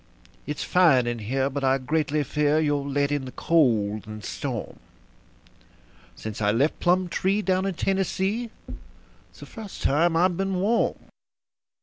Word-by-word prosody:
It's 150 0 -3
fine 160 -9 +4
in 120 -1 -2
here, 130 +5 -1
but 140 0 -4
I 135 0 +3
greatly 150 +2 0
fear 150 +2 +1
you'll 145 -2 0
let 140 +1 0
in 145 -2 -1
the 130 - -7
cold 110 -12 +1
and 110 -2 -8
storm - - -5 1.4
Since 110 0 -7
I 105 - +2
left 135 +8 +1
Plumtree, 185 +3 +1
down 190 0 +1
in 195 - -2
Tennessee, 195 +5 -1 0.8
it's - - -19
the - - -8
first 215 -3 -9
time 165 +4 +2
I've 175 0 +2
been 195 0 -1
warm." 205 +6 +1
150 Hz, 145 wpm, -25 LUFS, 130-185 Hz, 1.4 s, fine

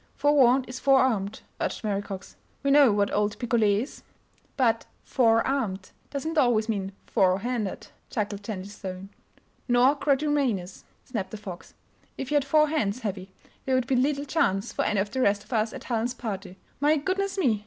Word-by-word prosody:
"Forewarned 270 -3 +4
is 255 +1 -7
forearmed," 255 -7 +2 0.2
urged - - -3
Mary 200 -2 0
Cox. 195 -2 -8 0.3
"We 280 - +2
know 280 -4 +7
what 205 0 +1
old 205 0 0
Picolet 220 -3 +2
is!" 280 - -11 0.6
"But 230 -4 +2 0.2
'four 225 -3 +3
armed' 210 -9 -2 0.2
doesn't 315 +3 -1
always 230 -4 +3
mean 195 -3 -2
'fore 190 -4 +3
handed'," 230 -4 -3 0.2
chuckled 205 -1 -3
Jennie 205 -3 -5
Stone. 195 -2 -8 0.6
"Nor 245 +2 +5
quadrumanous!" 275 -10 0 0.2
snapped 215 -7 -4
the 215 - -7
Fox. 185 -4 -9 0.4
"If 270 +1 -5
you - - +2
had 280 - +1
four 305 +2 +4
hands, 245 -7 -1
Heavy, 195 -4 -4 0.4
there 265 - +1
would 255 -1 +1
be 260 +1 +1
little 280 +3 +1
chance 210 - 0
for - - 0
any 210 - +1
of 200 +1 -1
the 260 - -1
rest 205 -2 +2
of 215 - -9
us 220 0 +1
at - - -8
Helen's 240 +1 -1
party. 195 -5 -6 0.2
My 295 +2 +3
goodness 385 +6 -1
me! 250 - +2
230 Hz, 175 wpm, -26 LUFS, 205-270 Hz, 0.6 s, know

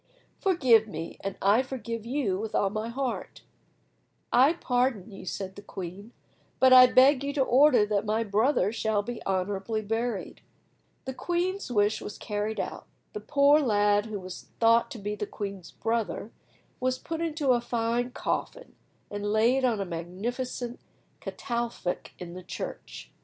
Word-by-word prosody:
Forgive 260 - +4
me, 165 -4 -6
and 195 -1 -4
I 205 +5 +5
forgive 230 -4 -5
you 240 -8 0
with 220 0 -4
all 195 - +2
my 215 +2 -3
heart." 260 +1 -4 0.9
"I 270 +6 +6
pardon 245 - 0
you," 195 -1 -10
said 190 +2 -4
the 205 - -9
queen, 195 +2 -8 0.5
"but 260 0 +7
I 255 0 +10
beg 260 +2 +5
you 280 - -1
to 275 - +2
order 260 -3 +5
that 205 -1 0
my 220 +2 +1
brother 210 0 +2
shall 220 -2 0
be 240 +2 -6
honourably 195 +3 -1
buried." 225 0 -3 0.6
The 265 - -4
queen's 355 +2 -2
wish 210 -1 +2
was 205 - -7
carried 210 +1 -3
out. - - -5 0.3
The 425 - -4
poor 290 -3 +4
lad, 205 -5 +2
who 210 -2 -4
was 185 -1 -9
thought 230 0 +4
to - - -7
be 205 0 -4
the 210 0 -4
queen's 195 -4 -6
brother, 225 -1 -2 0.5
was 255 0 0
put 325 +4 -5
in 330 -2 -2
a 255 -5 +3
fine 235 +1 -1
coffin, - - -4 0.4
and 205 0 -3
laid 235 +5 +3
on 235 -5 +2
a 195 - -1
magnificent 235 +9 -4 0.4
catafalque 235 -7 -4
in 175 -1 -8
the 185 - -8
church. 180 - -7
230 Hz, 160 wpm, -28 LUFS, 205-255 Hz, 0.9 s, I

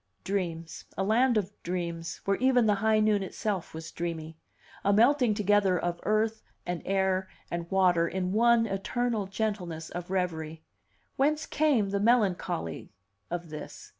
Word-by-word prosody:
Dreams, 170 -4 -3
a 195 - +1
land 235 +4 +3
of 200 -2 -1
dreams, 170 -1 -4
where 195 0 +2
even 255 -2 +4
the 210 - +4
high 220 0 +4
noon 215 -1 +3
itself 195 -1 -3
was 160 +1 -8
dreamy; 165 -2 -4 0.5
a 200 - +3
melting 240 +1 +4
together 205 -2 +3
of 175 0 -2
earth 220 +1 +1 0.2
and 175 -1 -3
air 190 -1 +1 0.2
and 170 0 -3
water 180 -3 +3
in 185 +1 -2
one 230 +2 +4
eternal 215 +1 -1
gentleness 190 -6 -3
of 175 0 -6
revery! 160 -4 -2 0.5
Whence 300 +3 +2
came 270 -10 +2
the 200 - 0
melancholy 195 - +1 0.4
of 175 -1 -4
this? 155 - -8
195 Hz, 145 wpm, -29 LUFS, 175-220 Hz, 0.5 s, even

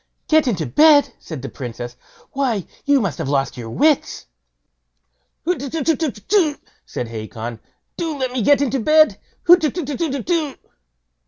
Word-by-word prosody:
"Get 310 -3 +4
into 180 -10 0
bed!" 290 - +5
said 155 -6 -8
the 135 - -5
Princess; 120 -1 -7 0.4
"why, 250 -9 -1 0.2
you 285 -1 +4
must 195 - -2
have 150 -4 -2
lost 140 -1 0
your 115 -2 -7
wits." 300 - +1 1.2
"Hutetutetutetu!" 315 - 0 0.3
said 125 - -4
Hacon; 110 +1 -6 0.4
"do 325 -3 -3
let 260 -2 -2
me 255 -1 -2
get 285 +6 +4
into 270 0 0
bed. 310 +6 +4 0.3
Hutetutetutetu." 315 -2 +1
275 Hz, 120 wpm, -20 LUFS, -, 1.2 s, bed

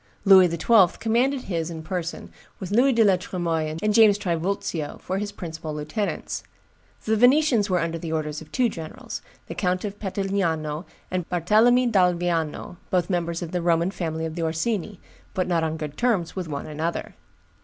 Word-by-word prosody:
Louis 190 -2 +8
XII. 175 +3 +4
commanded 250 +4 +1
his 170 -7 -3
in 160 -2 -7
person, 170 0 -4 0.3
with 190 0 -6
Louis 250 +6 +4
de 230 -2 +4
la 195 -3 +4
Tremoille 165 -4 -2
and 210 0 +2
James 215 -2 +6
Trivulzio 170 -4 -2
for 190 +1 -3
his 205 0 -3
principal 160 -5 -6
lieutenants; 150 +8 -3 0.6
the 220 - +2
Venetians 245 -2 +4
were 180 - +2
under 165 0 -2
the 160 -1 -5
orders 150 -1 -2
of - - -13
two 255 -2 +2
generals, 225 +6 -7 0.2
the - - -7
Count 180 0 -1
of 205 0 -6
Petigliano 185 -6 -1 0.3
and 180 -2 -2
Barthelemy 220 +9 +4
d'Alviano, 175 -4 0
both 180 0 +1
members 170 -1 -1
of 170 - -6
the 180 - -1
Roman 170 +1 +2
family 160 -4 -3
of 160 - -4
the 170 - -4
Orsini, 175 +4 -2 0.4
but 185 - 0
not 170 -2 +1
on 160 0 -1
good 150 -2 -6
terms 220 -9 0
with 185 -3 -4
one 145 -2 -4
another. 155 +3 -3
180 Hz, 175 wpm, -24 LUFS, 165-205 Hz, 0.6 s, Louis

